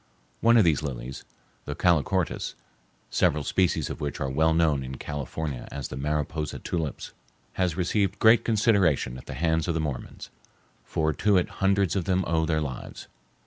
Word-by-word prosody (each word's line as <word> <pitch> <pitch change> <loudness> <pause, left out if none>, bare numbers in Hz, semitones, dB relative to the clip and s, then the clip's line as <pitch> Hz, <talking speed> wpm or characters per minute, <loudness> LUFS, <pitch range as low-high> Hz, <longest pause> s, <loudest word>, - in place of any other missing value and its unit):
One 115 +1 +5
of 110 - +7
these 80 -4 +3
lilies, 65 -2 -6 0.4
the - - -4
calochortus, 90 +1 +1 0.6
several 75 0 +2
species 90 +5 +1
of - - -7
which 70 -1 -3
are 70 -1 -2
well 80 +4 +3
known 80 -4 +2
in 65 0 -6
California 75 -2 -5
as 70 -3 -5
the - - -6
"Mariposa 75 +2 -2
tulips," 80 -4 -4 0.4
has 90 -4 0
received 95 +2 0
great 110 +1 +6
consideration 100 - +2
at - - -15
the - - -6
hands 80 0 +1
of 85 - 0
the - - 0
Mormons, 75 -5 -5 0.5
for 80 -1 0
to 105 +5 +3
it 90 - +1
hundreds 95 -1 +2
of 95 -4 -1
them 95 0 +1
owe 80 -1 +1
their 80 -1 +1
lives. 65 -4 -6
80 Hz, 170 wpm, -26 LUFS, 70-95 Hz, 0.6 s, of